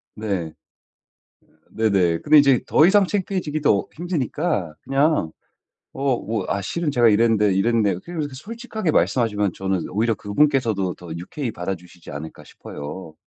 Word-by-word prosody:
네. 95 Hz, -7 st, -3 dB, 1.2 s
네네. 95 Hz, -7 st, +2 dB
근데 150 Hz, 0 st, +5 dB
이제 140 Hz, -4 st, +5 dB
더 155 Hz, -, +5 dB
이상 205 Hz, 0 st, +5 dB
창피해지기도 170 Hz, -, 0 dB
힘드니까 155 Hz, -, -2 dB
그냥 135 Hz, -, +1 dB, 0.6 s
어 135 Hz, -2 st, 0 dB
뭐 110 Hz, -3 st, -3 dB
"아 100 Hz, -, -1 dB
실은 170 Hz, -, -2 dB
제가 120 Hz, -5 st, +4 dB
이랬는데, 105 Hz, -2 st, +3 dB
이랬는데" 105 Hz, -1 st, +2 dB
그냥 170 Hz, -, -6 dB
이렇게 145 Hz, -2 st, -4 dB
솔직하게 220 Hz, -, -4 dB
말씀하시면 105 Hz, -, +1 dB
저는 95 Hz, -2 st, -2 dB
오히려 115 Hz, +4 st, +1 dB
그분께서도 110 Hz, -4 st, +1 dB
더 85 Hz, -2 st, -11 dB
유쾌히 120 Hz, -, -5 dB
받아 95 Hz, 0 st, -3 dB
주시지 90 Hz, 0 st, -14 dB
않을까 75 Hz, +3 st, -8 dB
싶어요. 80 Hz, +3 st, -9 dB
115 Hz, 345 characters per minute, -22 LUFS, 95-150 Hz, 1.2 s, 근데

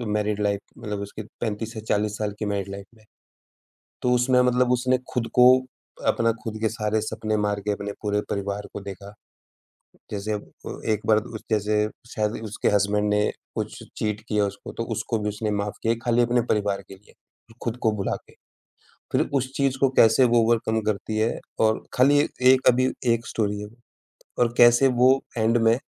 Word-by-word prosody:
Married 105 Hz, 0 st, 0 dB
life 100 Hz, -1 st, +1 dB, 0.2 s
मतलब 105 Hz, -4 st, -5 dB
उसकी 100 Hz, +2 st, -7 dB, 0.2 s
35 110 Hz, 0 st, -3 dB
से 110 Hz, -, -6 dB
40 105 Hz, 0 st, 0 dB
साल 105 Hz, -1 st, -2 dB
की 105 Hz, -, -2 dB
मैरिड 100 Hz, -1 st, -2 dB
लाइफ 100 Hz, 0 st, -7 dB
में। 110 Hz, -, -22 dB, 1.0 s
तो 125 Hz, -, +1 dB
उसमें 125 Hz, +1 st, +4 dB
मतलब 125 Hz, 0 st, +2 dB
उसने 125 Hz, +1 st, +2 dB
खुद 120 Hz, -3 st, -1 dB
को 125 Hz, -, +6 dB, 0.6 s
अपना 115 Hz, 0 st, +3 dB
खुद 110 Hz, -1 st, -4 dB
के 110 Hz, -, +2 dB
सारे 110 Hz, -1 st, -1 dB
सपने 110 Hz, 0 st, -2 dB
मार 105 Hz, 0 st, -1 dB
के -, -, +3 dB
अपने 100 Hz, 0 st, -4 dB
पूरे 105 Hz, -1 st, 0 dB
परिवार 100 Hz, +1 st, -3 dB
को 100 Hz, -, -6 dB
देखा, 100 Hz, +1 st, -9 dB, 1.0 s
जैसे 105 Hz, +1 st, -3 dB
अब 105 Hz, -, -4 dB, 0.2 s
अ, -, -, -7 dB
एक 105 Hz, -, +1 dB
बार 110 Hz, -1 st, +5 dB
उ 110 Hz, +1 st, -4 dB
जैसे 105 Hz, 0 st, +2 dB, 0.3 s
शायद 105 Hz, -1 st, 0 dB
उसके 105 Hz, -1 st, -3 dB
हसबैंड 105 Hz, +1 st, +1 dB
ने 105 Hz, 0 st, +2 dB, 0.3 s
कुछ -, -, -4 dB, 0.2 s
चीट 105 Hz, 0 st, -2 dB
किया 105 Hz, -1 st, +2 dB
उसको 100 Hz, -, -7 dB
तो -, -, -1 dB
उसको 115 Hz, -, -2 dB
भी 105 Hz, 0 st, -1 dB
उसने 105 Hz, +1 st, -3 dB
माफ़ 100 Hz, 0 st, -2 dB
किया 115 Hz, +1 st, +2 dB
खाली 120 Hz, 0 st, +3 dB
अपने 120 Hz, 0 st, +2 dB
परिवार 100 Hz, -2 st, -1 dB
के 95 Hz, -, -9 dB
लिए। 100 Hz, -, -22 dB, 0.5 s
खुद 120 Hz, 0 st, -2 dB
को 110 Hz, -, +4 dB
भुला 100 Hz, -, -1 dB
के, -, -, -18 dB, 0.8 s
फिर -, -, +3 dB
उस 130 Hz, -1 st, 0 dB
चीज़ 135 Hz, -1 st, +1 dB
को 135 Hz, -, +4 dB
कैसे 115 Hz, +3 st, +6 dB
वो 120 Hz, -1 st, +4 dB
ओवरकम 110 Hz, -1 st, +1 dB
करती 110 Hz, +1 st, -2 dB
है 110 Hz, +2 st, 0 dB, 0.2 s
और 110 Hz, 0 st, +2 dB
खाली 140 Hz, +3 st, +5 dB, 0.3 s
1 130 Hz, -, +1 dB
अभी 130 Hz, +1 st, +4 dB, 0.2 s
1 115 Hz, 0 st, -2 dB
स्टोरी 105 Hz, -2 st, -1 dB
है 105 Hz, -, -7 dB, 0.7 s
और 120 Hz, -1 st, +2 dB
कैसे 120 Hz, +2 st, +6 dB
वो 130 Hz, -, +7 dB, 0.3 s
एंड 115 Hz, +1 st, +3 dB
में 115 Hz, -, +6 dB
110 Hz, 190 wpm, -24 LUFS, 105-120 Hz, 1.0 s, वो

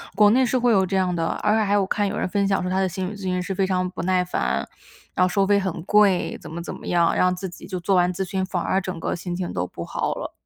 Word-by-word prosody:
国 205 Hz, +1 st, +6 dB
内 255 Hz, +3 st, +4 dB
是 255 Hz, -, +1 dB
会 245 Hz, 0 st, +3 dB
有 195 Hz, -3 st, +4 dB
这 190 Hz, +1 st, -1 dB
样 185 Hz, -2 st, +1 dB
的。 165 Hz, -1 st, 0 dB
而 210 Hz, +1 st, +1 dB
且 220 Hz, -, +2 dB
还 200 Hz, -1 st, 0 dB
有 205 Hz, -, +4 dB
我 190 Hz, -, -1 dB
看 205 Hz, +1 st, 0 dB
有 -, -, -3 dB
人 -, -, -1 dB
分 200 Hz, +1 st, 0 dB
享 195 Hz, -, +1 dB
说 180 Hz, -, -2 dB
他 185 Hz, +1 st, 0 dB
的 190 Hz, -, +2 dB
心 185 Hz, +1 st, -3 dB
理 210 Hz, -, -7 dB
咨 200 Hz, -, -11 dB
询 185 Hz, -1 st, -1 dB
师 190 Hz, +1 st, -4 dB
非 195 Hz, 0 st, +2 dB
常 185 Hz, -1 st, 0 dB
不 180 Hz, -, -6 dB
耐 185 Hz, 0 st, +2 dB
烦， 180 Hz, -, -1 dB, 0.5 s
然 -, -, +3 dB
后 -, -, 0 dB
收 195 Hz, +1 st, +1 dB
费 205 Hz, 0 st, +4 dB
很 190 Hz, -4 st, -3 dB
贵， 200 Hz, -1 st, +3 dB
怎 -, -, -10 dB
么 170 Hz, +2 st, -5 dB
怎 170 Hz, -, -6 dB
么 -, -, -10 dB
样， 170 Hz, -1 st, +2 dB
让 180 Hz, 0 st, +3 dB
自 190 Hz, +1 st, -5 dB
己 175 Hz, -, -12 dB
就 185 Hz, -2 st, -4 dB
做 190 Hz, +2 st, +1 dB
完 180 Hz, 0 st, +3 dB
咨 190 Hz, +2 st, -2 dB
询， 190 Hz, +1 st, -2 dB
反 185 Hz, -2 st, -2 dB
而 190 Hz, -, 0 dB
整 185 Hz, -3 st, -5 dB
个 -, -, -2 dB
心 175 Hz, 0 st, -5 dB
情 180 Hz, -1 st, -4 dB
都 90 Hz, -, -1 dB
不 85 Hz, -, -7 dB
好 -, -, -2 dB
了。 -, -, -6 dB
185 Hz, 345 characters per minute, -23 LUFS, 180-200 Hz, 0.5 s, 国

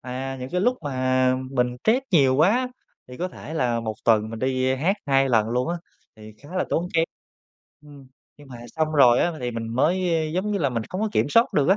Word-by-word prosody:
À, 130 Hz, +1 st, -5 dB
những 130 Hz, -, -6 dB
cái 180 Hz, -, 0 dB
lúc 250 Hz, +5 st, +2 dB
mà 130 Hz, -2 st, +1 dB, 0.2 s
mình 125 Hz, -2 st, 0 dB
stress 245 Hz, +4 st, +3 dB
nhiều 135 Hz, -7 st, +4 dB
quá 225 Hz, -, +3 dB, 0.4 s
thì 125 Hz, -, -10 dB
có 180 Hz, +1 st, -3 dB
thể 160 Hz, -2 st, -9 dB
là 120 Hz, -6 st, 0 dB
1 110 Hz, -1 st, -4 dB
tuần 110 Hz, -1 st, +3 dB
mình 115 Hz, -, -6 dB
đi, 130 Hz, 0 st, 0 dB
ơ, 130 Hz, -, +1 dB
hát 185 Hz, +9 st, +1 dB
2 135 Hz, -1 st, +3 dB
lần 110 Hz, -3 st, +2 dB
luôn 125 Hz, +5 st, -1 dB
á, 175 Hz, -, -1 dB, 0.4 s
thì 110 Hz, 0 st, -12 dB
khá 145 Hz, -, -14 dB
là -, -, +1 dB
tốn 175 Hz, +2 st, 0 dB
kém. 165 Hz, 0 st, +4 dB, 0.8 s
Ừm, 145 Hz, -2 st, -15 dB, 0.3 s
nhưng 145 Hz, -2 st, -16 dB
mà 125 Hz, -, -9 dB, 0.2 s
xong 155 Hz, 0 st, 0 dB
rồi 125 Hz, -5 st, +5 dB
á 175 Hz, -, +2 dB
m -, -, -8 dB
thì 125 Hz, -, -2 dB
mình 115 Hz, -1 st, -5 dB
mới, 175 Hz, +6 st, +1 dB
ơ, 155 Hz, -1 st, -1 dB
giống 190 Hz, +3 st, -1 dB
như 200 Hz, -, 0 dB
là, 140 Hz, -5 st, +1 dB
mình 115 Hz, -3 st, -3 dB
không 185 Hz, -, -4 dB
có 220 Hz, -, 0 dB
kiểm -, -, +1 dB
soát 230 Hz, +9 st, +3 dB
được 145 Hz, +2 st, +2 dB
á, 195 Hz, -, +5 dB
135 Hz, 250 wpm, -24 LUFS, 125-170 Hz, 0.8 s, rồi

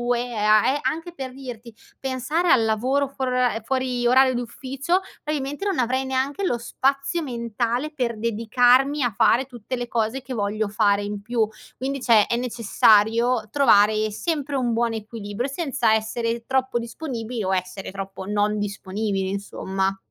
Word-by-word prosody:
e 240 Hz, 0 st, -3 dB
a 215 Hz, -1 st, +4 dB
e 290 Hz, -, -1 dB
anche 330 Hz, +2 st, -3 dB
per 265 Hz, -5 st, -6 dB
dirti 245 Hz, -4 st, -9 dB, 0.3 s
pensare 270 Hz, +7 st, -1 dB
al 230 Hz, -, +5 dB
lavoro 255 Hz, +6 st, +1 dB
fuori 260 Hz, -1 st, -3 dB
ora 250 Hz, -2 st, +2 dB
ehm, 225 Hz, -, -4 dB
fuori 255 Hz, -1 st, -1 dB
orario 260 Hz, +1 st, +5 dB
di 240 Hz, -, -1 dB
ufficio, 270 Hz, +8 st, -2 dB, 0.2 s
probabilmente 290 Hz, +3 st, -3 dB
non 395 Hz, -3 st, 0 dB
avrei 255 Hz, +2 st, +1 dB
neanche 265 Hz, +7 st, -1 dB
lo 245 Hz, -, +1 dB
spazio 275 Hz, +7 st, 0 dB
mentale 235 Hz, +2 st, -2 dB
per 240 Hz, -6 st, -2 dB
dedicarmi 245 Hz, +5 st, +3 dB
a 240 Hz, -3 st, 0 dB
fare 240 Hz, +3 st, +4 dB
tutte 250 Hz, -1 st, -6 dB
le 245 Hz, -1 st, -4 dB
cose 230 Hz, +3 st, -1 dB
che 260 Hz, 0 st, -7 dB
voglio 210 Hz, 0 st, -1 dB
fare 205 Hz, -1 st, +2 dB
in 205 Hz, 0 st, -5 dB
più. 230 Hz, -1 st, +1 dB, 0.3 s
Quindi 275 Hz, +1 st, -3 dB
cioè, 225 Hz, -4 st, +5 dB
è -, -, 0 dB
necessario 230 Hz, 0 st, +3 dB
trovare 215 Hz, -5 st, +4 dB
sempre 290 Hz, -, -2 dB
un 245 Hz, -3 st, 0 dB
buon 235 Hz, 0 st, +1 dB
equilibrio 220 Hz, +2 st, -4 dB
senza 275 Hz, -7 st, +1 dB
essere 230 Hz, +1 st, -2 dB
troppo 260 Hz, -1 st, 0 dB
disponibili 235 Hz, -2 st, -4 dB
o 190 Hz, 0 st, 0 dB
essere 185 Hz, +1 st, -3 dB
troppo 195 Hz, 0 st, -7 dB
non 210 Hz, +1 st, 0 dB
disponibili, 200 Hz, -1 st, -2 dB
insomma. 195 Hz, -1 st, -2 dB
240 Hz, 160 wpm, -23 LUFS, 215-265 Hz, 0.3 s, al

